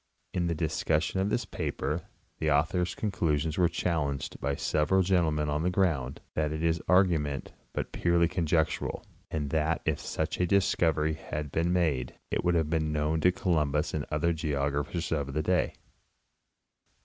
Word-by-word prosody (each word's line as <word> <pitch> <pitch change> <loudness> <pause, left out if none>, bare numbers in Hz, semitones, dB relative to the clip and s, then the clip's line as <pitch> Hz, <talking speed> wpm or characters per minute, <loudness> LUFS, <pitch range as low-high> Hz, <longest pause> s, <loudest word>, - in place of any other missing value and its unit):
In 85 -1 0
the 85 - 0
discussion 80 +2 0
of 95 +2 +1
this 120 +3 0
paper 80 +2 -3 0.3
the 80 - +1
author's 80 +5 +1
con 105 - -2
clusions 80 -4 0
were 90 -2 +4
challenged 75 -6 -2
by 70 +1 -1
several 80 +7 +2
gentlemen 80 -5 +2
on 75 +1 0
the 90 - +1
ground 80 -9 0
that 75 -1 0
its 80 +1 0
ar 90 +3 +6
gument 75 -6 -2 0.3
was - - 0
purely 85 0 +2
conjectural, 80 -2 0 0.3
and 75 -3 -3
that 80 +1 +1
if - - 0
such - - -3
a 90 - +2
discovery 80 -5 +2
had 75 -2 -5
been 85 +3 +1
made 75 -9 0 0.2
it - - 0
would 90 0 +2
have 80 -2 +1
been 80 -2 +1
known 75 +1 0
to 90 - +5
Columbus 75 -5 0
and 75 -2 -2
other 85 +3 +1
geographers 75 +1 -1
of 70 -4 -1
the 75 - +1
day. 90 +3 +1
80 Hz, 165 wpm, -29 LUFS, 75-85 Hz, 0.3 s, ar